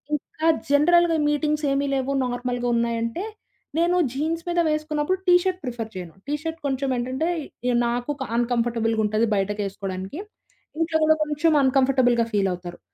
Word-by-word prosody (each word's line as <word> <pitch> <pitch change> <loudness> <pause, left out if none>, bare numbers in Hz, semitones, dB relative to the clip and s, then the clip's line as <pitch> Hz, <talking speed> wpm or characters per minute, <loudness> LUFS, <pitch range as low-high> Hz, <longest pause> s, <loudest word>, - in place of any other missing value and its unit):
ఇంకా 310 +2 -3 0.2
జనరల్‌గా 335 +3 +4
మీటింగ్స్ 300 0 0
ఏమీ 280 +1 +1
లేవు 265 +1 -1
నార్మల్‌గా 245 0 -2
ఉన్నాయంటే 230 - -1 0.6
నేను 345 +1 +3 0.2
జీన్స్ 320 +4 -2
మీద 345 - +1
వేసుకున్నప్పుడు 305 +3 -1
టీ 360 - +6
షర్ట్ 370 -1 -1
ప్రిఫర్ 235 -4 -5
చేయను. 175 -3 -7
టీ 290 - -1
షర్ట్ 325 0 -4
కొంచెం 270 0 -1
ఏంటంటే 260 +6 -1 0.4
ఇగ 250 - +2
నాకు 245 +4 -1 0.2
అన్‌కంఫర్టబుల్‌గా 230 -2 +1
ఉంటది 215 +2 +1
బయటకేసుకోవడానికి. 195 - -3 0.6
ఇంట్లో 325 -1 +1
కూడా 315 0 +5
కొంచెం 305 +2 +1
అన్‌కంఫర్టబుల్‌గా 255 -3 +3
ఫీలవుతారు. 180 -3 -1
260 Hz, 135 wpm, -24 LUFS, 230-305 Hz, 0.6 s, టీ